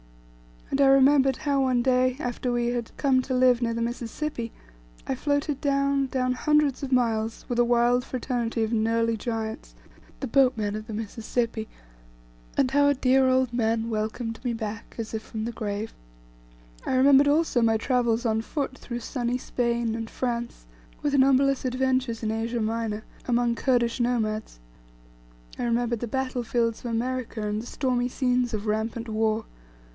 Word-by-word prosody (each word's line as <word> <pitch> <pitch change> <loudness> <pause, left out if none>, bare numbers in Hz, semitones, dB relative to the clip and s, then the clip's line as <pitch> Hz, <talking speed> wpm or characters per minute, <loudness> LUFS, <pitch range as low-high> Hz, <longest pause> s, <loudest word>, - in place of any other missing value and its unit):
And 275 - 0
I 275 - +6
remembered 270 0 +5
how 280 -1 0
one 250 -2 +2
day, 255 0 +3
after 245 -2 -3
we 240 0 0
had 240 -1 -3
come 265 -3 +3
to 260 - -2
live 250 -1 +4
near 230 -1 0
the 230 - -2
Mississipi, 240 +1 -4 0.6
I - - -1
floated 285 +1 -1
down, 275 -1 +1
down, 255 -1 0
hundreds 300 +1 +2
of 275 -2 -4
miles, 225 -3 0
with 240 -1 -1
a 240 - +5
wild 240 +1 +3
fraternity 240 -3 -2
of 220 - -2
knurly 230 0 +1
giants, 220 0 -5 0.5
the - - -1
boatmen 230 -5 +2
of 215 0 -6
the 220 - -6
Mississipi, 225 +1 -3 0.9
and 265 -2 +2
how 285 +1 +4
a 285 - +3
dear 260 0 +3
old 255 -1 +2
man 230 -1 0
welcomed 225 +1 -3
me 245 -2 -1
back, 220 -1 -6
as 225 -1 -5
if 220 - -2
from 220 0 -5
the 235 - -3
grave. 215 -1 -4 0.9
I - - -1
remembered 275 +2 +6
also 295 -4 +2
my 225 -1 +3
travels 240 -1 +1
on 220 -1 +1
foot 270 +2 -3
through 240 -1 -6
sunny 245 0 -2
Spain, 235 -2 -1
and 225 0 -4
France, 235 - -3 0.4
with 290 -1 0
numberless 275 0 +4
adventures 255 -2 0
in 215 - 0
Asia 230 +1 -2
Minor, 220 -1 -2 0.2
among 240 -1 +2
Kurdish 240 0 +1
nomads. 220 - -1 1.0
I - - -1
remembered 235 0 0
the 240 - -3
battle 255 0 -2
fields 230 -1 0
of - - -7
America 235 -2 -2
and 210 +1 -2
the 240 - -10
stormy 250 -2 0
scenes 250 -1 0
of 215 0 -3
rampant 220 +2 -2
war. 220 0 0
240 Hz, 165 wpm, -26 LUFS, 225-260 Hz, 1.0 s, I